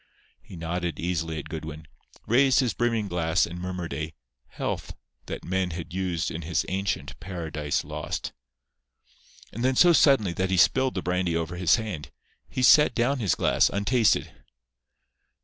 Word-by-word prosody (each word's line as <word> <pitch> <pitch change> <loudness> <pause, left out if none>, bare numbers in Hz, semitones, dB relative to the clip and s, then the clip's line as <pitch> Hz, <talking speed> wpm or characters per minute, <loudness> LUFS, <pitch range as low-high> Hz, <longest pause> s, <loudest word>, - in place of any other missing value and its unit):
He - - -12
nodded 85 -1 -3
easily 80 -2 -2
at 75 - -6
Goodwin, 80 -1 -7 0.4
raised 130 +2 +4
his 125 -3 +1
brimming 115 -3 0
glass 85 -3 +1
and 85 +1 -8
murmured 90 -2 -4
a 80 0 -5 0.3
"health" - - -4 0.3
that - - -6
men 95 0 0
had 85 -1 -7
used 90 -2 -2
in 80 - -5
his 85 +1 -1
ancient 95 +1 -3
Paradise 80 -6 -3
Lost. - - -5 1.2
And 120 - -4
then 130 0 +2
so 175 +5 +6
suddenly 135 - +4
that 95 +2 -1
he 95 - +1
spilled 130 +7 +3
the 90 - -2
brandy 90 -1 0
over 85 +1 -3
his 90 -2 +4
hand, 90 -11 -5 0.4
he 130 - -2
set 150 0 +6
down 130 +3 +1
his 105 -6 +1
glass, - - +3
untasted. 110 +3 +2
90 Hz, 155 wpm, -26 LUFS, 85-110 Hz, 1.2 s, so